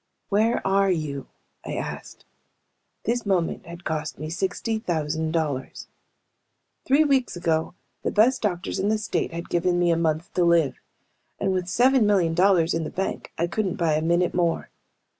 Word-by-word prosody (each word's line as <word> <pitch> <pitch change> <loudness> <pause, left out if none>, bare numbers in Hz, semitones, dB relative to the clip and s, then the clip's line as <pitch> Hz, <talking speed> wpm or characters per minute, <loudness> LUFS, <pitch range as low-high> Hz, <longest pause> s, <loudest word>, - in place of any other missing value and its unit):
"Where 220 +3 +2
are 195 0 +3
you?" 150 -6 -2 0.4
I - - -5
asked. - - -6 0.8
This 240 +1 0
moment 185 -6 -1
had 170 +1 -9
cost 155 -2 -3
me 155 +2 -6
sixty 195 +5 -2
thousand 160 -4 -1
dollars. 150 -5 -3 1.0
Three 280 +4 +4
weeks 270 -7 +1
ago 165 -1 -1 0.3
the - - -1
best 250 +5 +3
doctors 185 -4 -2
in 200 - +1
the 220 - +2
state 215 - -2
had 170 +1 -6
given 175 +1 +1
me 175 -1 +3
a - - +3
month 165 +2 -1
to 180 - +2
live. 170 -4 +2 0.6
And 195 -1 0
with 180 -1 -2
seven 245 +2 +4
million 185 -6 +3
dollars 175 -2 +3
in 165 0 -1
the 155 - -4
bank 190 - -4
I 170 - +1
couldn't 185 +2 -1
buy 165 -3 +1
a 155 - +1
minute 170 +2 +1
more. 170 -2 0
175 Hz, 170 wpm, -25 LUFS, 165-200 Hz, 1.0 s, Three